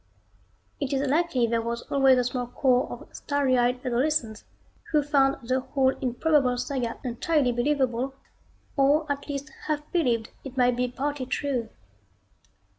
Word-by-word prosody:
It 280 Hz, -1 st, -2 dB
is 275 Hz, +1 st, 0 dB
likely 290 Hz, -4 st, +2 dB
there 230 Hz, 0 st, 0 dB
was 235 Hz, +1 st, -3 dB
always 270 Hz, -2 st, +4 dB
a 250 Hz, -, +3 dB
small 250 Hz, 0 st, -2 dB
corps 250 Hz, 0 st, +2 dB
of -, -, -10 dB
starry 285 Hz, -3 st, +1 dB
eyed 250 Hz, +1 st, +1 dB
adolescents 250 Hz, -3 st, 0 dB, 0.5 s
who 300 Hz, -2 st, +3 dB
found 275 Hz, -4 st, +2 dB
the 255 Hz, +1 st, +2 dB
whole 265 Hz, 0 st, +1 dB
improbable 260 Hz, 0 st, +2 dB
saga 250 Hz, -2 st, -2 dB
entirely 265 Hz, +2 st, +1 dB
believable, 260 Hz, 0 st, 0 dB, 0.6 s
or 285 Hz, +3 st, +3 dB
at 285 Hz, +1 st, -4 dB
least 285 Hz, +1 st, -4 dB, 0.2 s
half 300 Hz, -1 st, -2 dB
believed 240 Hz, -10 st, +1 dB
it 270 Hz, -1 st, -9 dB
might 250 Hz, -1 st, +4 dB
be 250 Hz, +1 st, 0 dB
partly 270 Hz, +1 st, -3 dB
true. 255 Hz, -5 st, -2 dB
265 Hz, 145 wpm, -26 LUFS, 245-285 Hz, 0.6 s, always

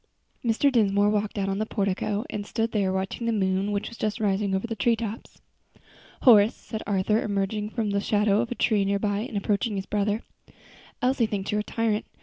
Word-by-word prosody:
Mr. 240 Hz, +4 st, +2 dB
Dinsmore 205 Hz, -3 st, +3 dB
walked 210 Hz, 0 st, -1 dB
out 195 Hz, -1 st, 0 dB
on 195 Hz, 0 st, -1 dB
to -, -, -3 dB
the 215 Hz, -, 0 dB
portico, 200 Hz, +2 st, -1 dB
and 205 Hz, -, -4 dB
stood 225 Hz, 0 st, -1 dB
there 200 Hz, -3 st, +1 dB
watching 190 Hz, +5 st, -3 dB
the -, -, +2 dB
moon 195 Hz, -1 st, 0 dB
which 200 Hz, 0 st, -2 dB
was 235 Hz, -, -10 dB
just 215 Hz, +1 st, -1 dB
rising 200 Hz, -1 st, +1 dB
over 190 Hz, -, -1 dB
the 225 Hz, -1 st, -4 dB
treetops. 225 Hz, 0 st, -2 dB, 0.8 s
"Horace," 220 Hz, -4 st, +7 dB
said 220 Hz, -2 st, -7 dB
Arthur, 205 Hz, +2 st, +1 dB
emerging 210 Hz, +1 st, -1 dB
from 220 Hz, -2 st, -2 dB
the 200 Hz, 0 st, +1 dB
shadow 210 Hz, 0 st, +2 dB
of 240 Hz, -, -3 dB
a -, -, -2 dB
tree 215 Hz, -4 st, +2 dB
near 200 Hz, +1 st, +1 dB
by 205 Hz, 0 st, -1 dB
and 215 Hz, -1 st, -4 dB
approaching 205 Hz, +2 st, 0 dB
his 195 Hz, -1 st, -3 dB
brother, 210 Hz, +2 st, -1 dB, 0.8 s
"Elsie 250 Hz, -2 st, +2 dB
thinks 200 Hz, -2 st, -3 dB
you're 210 Hz, -, +1 dB
a -, -, -6 dB
tyrant. 220 Hz, -1 st, -1 dB
210 Hz, 205 wpm, -26 LUFS, 200-225 Hz, 0.8 s, Horace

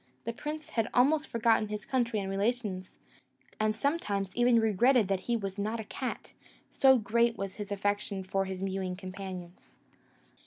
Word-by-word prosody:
The 230 Hz, -, -3 dB
prince 300 Hz, +4 st, -6 dB
had 225 Hz, -1 st, 0 dB
almost 295 Hz, +5 st, +4 dB
forgotten 230 Hz, -2 st, +2 dB
his 210 Hz, 0 st, -5 dB
country 235 Hz, -4 st, 0 dB
and 195 Hz, -, -3 dB
relations, 195 Hz, -1 st, -2 dB, 0.6 s
and 215 Hz, 0 st, +1 dB
sometimes 200 Hz, -, -1 dB
even 240 Hz, -1 st, +5 dB
regretted 225 Hz, +2 st, +4 dB
that 195 Hz, -1 st, +1 dB
he 235 Hz, -, +3 dB
was 195 Hz, -2 st, -5 dB
not 215 Hz, +3 st, -1 dB
a -, -, -3 dB
cat, 255 Hz, +4 st, -5 dB, 0.4 s
so 265 Hz, -1 st, +6 dB
great 235 Hz, +2 st, +2 dB
was 195 Hz, -1 st, -5 dB
his 205 Hz, -1 st, -6 dB
affection 205 Hz, -1 st, -1 dB
for 195 Hz, +1 st, -1 dB
his 190 Hz, 0 st, -5 dB
mewing 190 Hz, -1 st, -2 dB
companions. 185 Hz, -2 st, -8 dB
210 Hz, 160 wpm, -30 LUFS, 195-235 Hz, 0.6 s, so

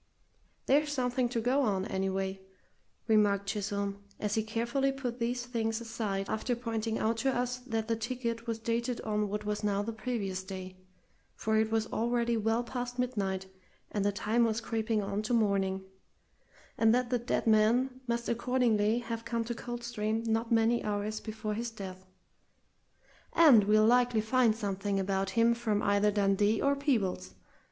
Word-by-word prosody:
"There's 295 Hz, +2 st, +3 dB
something 250 Hz, -2 st, 0 dB
to 235 Hz, -, -1 dB
go 250 Hz, +5 st, +2 dB
on, 195 Hz, -7 st, +1 dB
anyway," 190 Hz, 0 st, -2 dB, 0.7 s
remarked 205 Hz, -2 st, +3 dB
Chisholm, 200 Hz, -1 st, -3 dB, 0.2 s
as 210 Hz, -1 st, -1 dB
he 220 Hz, -, +2 dB
carefully 235 Hz, +5 st, 0 dB
put 255 Hz, -3 st, -4 dB
these 240 Hz, +1 st, -1 dB
things 225 Hz, -2 st, -1 dB
aside 220 Hz, -4 st, -3 dB
after 245 Hz, +3 st, -1 dB
pointing 225 Hz, -2 st, -2 dB
out 225 Hz, +1 st, 0 dB
to 265 Hz, +3 st, +1 dB
us 250 Hz, 0 st, -1 dB
that 225 Hz, -2 st, -2 dB
the 230 Hz, -, +1 dB
ticket 235 Hz, 0 st, -3 dB
was 230 Hz, -1 st, -1 dB
dated 235 Hz, +2 st, -2 dB
on 210 Hz, -1 st, -1 dB
what 210 Hz, +1 st, -3 dB
was 210 Hz, 0 st, -2 dB
now 205 Hz, -1 st, +1 dB
the 230 Hz, +2 st, -4 dB
previous 210 Hz, -5 st, -3 dB
day 185 Hz, -1 st, -7 dB, 0.6 s
(for 220 Hz, 0 st, -1 dB
it 220 Hz, 0 st, +3 dB
was 225 Hz, -1 st, +1 dB
already 235 Hz, +1 st, +1 dB
well 225 Hz, +2 st, +1 dB
past 245 Hz, 0 st, -5 dB
midnight, 200 Hz, -7 st, -1 dB, 0.5 s
and 205 Hz, -, -1 dB
the 205 Hz, -, +2 dB
time 220 Hz, +4 st, +1 dB
was 225 Hz, -1 st, +1 dB
creeping 225 Hz, -2 st, -1 dB
on 200 Hz, +1 st, -2 dB
to 215 Hz, +3 st, 0 dB
morning), 195 Hz, -3 st, +1 dB, 1.0 s
and 225 Hz, +1 st, +5 dB
that 250 Hz, 0 st, 0 dB
the 245 Hz, -, +2 dB
dead 240 Hz, -, -1 dB
man 235 Hz, +4 st, +3 dB
must 235 Hz, 0 st, -1 dB
accordingly 235 Hz, -2 st, +2 dB
have 230 Hz, -1 st, -5 dB
come 230 Hz, -1 st, -1 dB
to 235 Hz, +1 st, -3 dB
Coldstream 235 Hz, -2 st, -3 dB
not 225 Hz, +1 st, 0 dB
many 230 Hz, +1 st, +3 dB
hours 210 Hz, +1 st, -2 dB
before 215 Hz, -1 st, -4 dB
his 235 Hz, +3 st, -3 dB
death; 190 Hz, -4 st, -9 dB, 1.3 s
"and 275 Hz, -11 st, +7 dB
we'll 215 Hz, +1 st, +5 dB
likely 245 Hz, 0 st, +4 dB
find 230 Hz, 0 st, +3 dB
something 200 Hz, -2 st, -2 dB
about 195 Hz, 0 st, 0 dB
him 230 Hz, +1 st, +5 dB
from 220 Hz, -3 st, -1 dB
either 200 Hz, +1 st, +3 dB
Dundee 205 Hz, +1 st, +2 dB
or 280 Hz, 0 st, +2 dB
Peebles. 215 Hz, -, -1 dB
225 Hz, 165 wpm, -31 LUFS, 205-240 Hz, 1.3 s, and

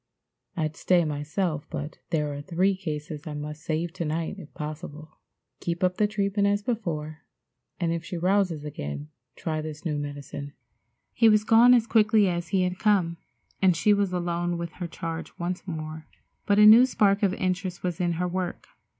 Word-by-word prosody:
I'd 155 Hz, -1 st, -1 dB
stay 175 Hz, -1 st, +3 dB
myself, 150 Hz, +2 st, -2 dB
but 150 Hz, +2 st, -6 dB
there 150 Hz, -3 st, 0 dB
are 140 Hz, -, -5 dB
three 185 Hz, +5 st, +1 dB
cases 150 Hz, -4 st, -5 dB
I 150 Hz, -, -5 dB
must 150 Hz, +1 st, -6 dB
save 165 Hz, +2 st, -2 dB
to -, -, -3 dB
night 165 Hz, +5 st, -3 dB
if 160 Hz, -5 st, -11 dB
possible. 155 Hz, 0 st, -7 dB, 0.4 s
Keep 170 Hz, +2 st, -3 dB
up 180 Hz, 0 st, +2 dB
the 210 Hz, -, +3 dB
treatment 200 Hz, -1 st, 0 dB
as 205 Hz, 0 st, +1 dB
before, 160 Hz, -10 st, -3 dB, 0.6 s
and 170 Hz, -2 st, 0 dB
if 170 Hz, 0 st, -3 dB
she 175 Hz, -, -5 dB
rouses 180 Hz, -3 st, +1 dB
again 75 Hz, -, -6 dB, 0.3 s
try 155 Hz, -1 st, -3 dB
this 155 Hz, +1 st, -7 dB
new 150 Hz, -3 st, -1 dB
medicine." 145 Hz, 0 st, -6 dB, 0.6 s
He 230 Hz, -2 st, +5 dB
was 215 Hz, -1 st, +4 dB
gone 235 Hz, +3 st, +7 dB
as 235 Hz, -2 st, +3 dB
quickly 215 Hz, -2 st, +4 dB
as 175 Hz, -1 st, -2 dB
he 185 Hz, +2 st, +1 dB
had 180 Hz, 0 st, -2 dB
come, 185 Hz, -6 st, +2 dB, 0.4 s
and 185 Hz, -3 st, +4 dB
she 205 Hz, +6 st, +4 dB
was 200 Hz, -2 st, +1 dB
alone 175 Hz, -1 st, -1 dB
with 170 Hz, -1 st, -4 dB
her 175 Hz, -1 st, -6 dB
charge 165 Hz, 0 st, -6 dB
once 180 Hz, +3 st, -4 dB
more, 155 Hz, -2 st, -6 dB, 0.4 s
but 205 Hz, -, +3 dB
a 210 Hz, -, +8 dB
new 230 Hz, +4 st, +9 dB
spark 205 Hz, -5 st, +2 dB
of 195 Hz, -2 st, +2 dB
interest 185 Hz, -1 st, -2 dB
was 180 Hz, 0 st, -2 dB
in 175 Hz, -1 st, +1 dB
her 180 Hz, +2 st, -1 dB
work. 180 Hz, 0 st, -4 dB
175 Hz, 185 wpm, -26 LUFS, 155-195 Hz, 0.6 s, new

